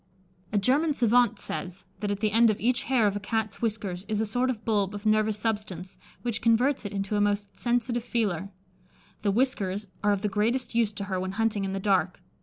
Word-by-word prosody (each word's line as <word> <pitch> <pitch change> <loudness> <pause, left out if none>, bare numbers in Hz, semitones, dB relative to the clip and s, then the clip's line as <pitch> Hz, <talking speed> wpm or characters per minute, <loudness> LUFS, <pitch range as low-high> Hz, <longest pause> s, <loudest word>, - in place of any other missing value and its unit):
A 210 - +1
German 285 +9 +2
savant 240 -1 +3
says, 185 -1 -5 0.2
that 205 - -2
at 205 0 -2
the 215 -1 +2
end 230 +2 +5
of 210 - 0
each 245 +3 +1
hair 255 -4 +3
of 205 -1 +1
a - - -1
Cat's 215 +1 -2
whiskers 205 -5 -2
is 215 -1 0
a 220 - +1
sort 245 +4 0
of 225 -4 -4
bulb 205 -3 +1
of 205 +1 -8
nervous 215 0 +2
substance, 205 -4 -3 0.2
which 235 -2 -2
converts 240 +2 +2
it 205 - -4
into 195 +1 -2
a 205 - +2
most 205 -1 -1
sensitive 240 0 0
feeler. 200 -7 -1 0.7
The 205 - +1
whiskers 205 -3 0 0.2
are 205 - +4
of 200 0 0
the - - +2
greatest 230 +5 0
use 230 -2 +2
to 200 - -5
her 190 -2 -2
when 185 +1 -3
hunting 215 -2 0
in 190 - -3
the 195 - -2
dark. 190 -3 +1
210 Hz, 215 wpm, -27 LUFS, 200-230 Hz, 0.7 s, end